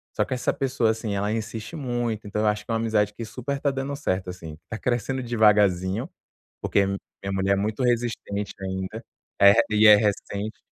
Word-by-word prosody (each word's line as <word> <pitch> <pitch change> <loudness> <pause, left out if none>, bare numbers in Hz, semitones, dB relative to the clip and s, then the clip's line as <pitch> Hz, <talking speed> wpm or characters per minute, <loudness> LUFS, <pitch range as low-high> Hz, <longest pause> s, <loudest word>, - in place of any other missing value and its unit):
Só - - +1
que - - -4
essa 125 - 0
pessoa, 130 -4 0
assim, 110 -2 -3
ela 100 +1 -1
insiste 110 +5 -4
muito, 120 -6 -2
então, 105 +1 -2
eu 110 - +2
acho 105 0 0
que - - -5
é - - +1
uma 115 - +1
amizade 105 -2 +1
que 115 - -7
super 135 +5 -4
tá 140 - +1
dando 135 +1 -3
certo, 95 -9 -2
assim, 80 -4 -9
tá 110 - -4
crescendo 125 +2 -1
devagarzinho, 105 - +2 0.5
porque 100 - +2
minha 100 0 -6
mulher 95 +1 +2
é - - +3
muito 105 +5 -1
resistente 115 -4 -1
ainda, 95 0 -4 0.4
eh, 100 0 +9 0.2
e 110 0 +6
é 105 - +10
recente. 105 0 -2
110 Hz, 195 wpm, -25 LUFS, 100-120 Hz, 0.5 s, é